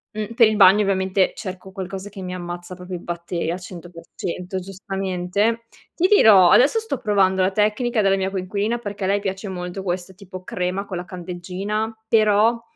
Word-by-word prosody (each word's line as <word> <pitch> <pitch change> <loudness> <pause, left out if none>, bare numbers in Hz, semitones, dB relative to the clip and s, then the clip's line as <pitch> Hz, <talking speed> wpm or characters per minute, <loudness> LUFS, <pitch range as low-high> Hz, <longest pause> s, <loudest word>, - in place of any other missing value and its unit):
Mhmm, 215 +1 -4
per 230 -3 +6
il 215 -1 0
bagno 200 +1 +7
ovviamente 190 -1 +1
cerco 190 -2 -7
qualcosa 195 +1 -6
che 195 -1 -10
mi 180 0 -5
ammazza 175 0 -7
proprio 180 0 -7
i - - -12
batteri 170 -1 -4
al 180 - -4
100%, 180 +1 -7
giustamente. 195 +3 -2 0.3
Ti 365 - +3
dirò, 210 - +7
adesso 290 - +5
sto 440 - -4
provando 190 -3 +2
la 185 +1 +2
tecnica 215 +3 +1
della 195 -1 +3
mia 190 0 -1
coinquilina 200 +5 -2
perché 205 -3 -5
a - - 0
lei 200 +1 +2
piace 195 +1 -4
molto 180 0 -5
questo 180 0 -4
tipo 185 -1 -11
crema 180 +3 -3
con 185 -3 -5
la 175 - -5
candeggina, 185 +5 -4
però 220 +1 +3
190 Hz, 180 wpm, -22 LUFS, 180-210 Hz, 0.3 s, bagno